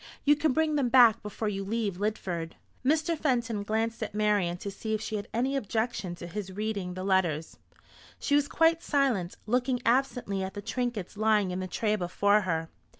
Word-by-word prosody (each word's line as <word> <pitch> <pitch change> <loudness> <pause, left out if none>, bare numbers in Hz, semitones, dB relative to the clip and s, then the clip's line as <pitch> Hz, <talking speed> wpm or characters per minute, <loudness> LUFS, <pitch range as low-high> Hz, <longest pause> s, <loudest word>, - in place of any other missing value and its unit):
You 295 +1 +6
can 295 0 +1
bring 310 +1 +1
them 265 -4 +1
back 235 -3 +6
before 210 +1 -4
you 195 -1 -2
leave 205 -2 -2
Lidford." 180 -6 -3 0.3
Mr. 310 +4 +2
Fenton 235 -8 0
glanced 225 +3 -1
at 215 -1 -4
Marian 205 -5 +1
to 200 +2 -5
see 220 +2 -3
if - - -2
she 220 - -3
had 205 - -4
any 255 +4 0
objection 220 -6 -2
to 175 - -9
his 190 +2 -5
reading 200 -3 -3
the 185 - -5
letters. 175 -5 0 0.6
She 285 - -2
was 290 0 +4
quite 330 +2 +3
silent, 255 - 0
looking 250 +3 +1
absently 240 -5 +1
at 190 +2 -5
the 205 - -4
trinkets 225 -4 -3
lying 210 -3 +2
in 180 - -3
the 185 - -3
tray 210 +3 0
before 200 +2 +2
her. 165 -4 -2
215 Hz, 190 wpm, -29 LUFS, 190-250 Hz, 0.6 s, You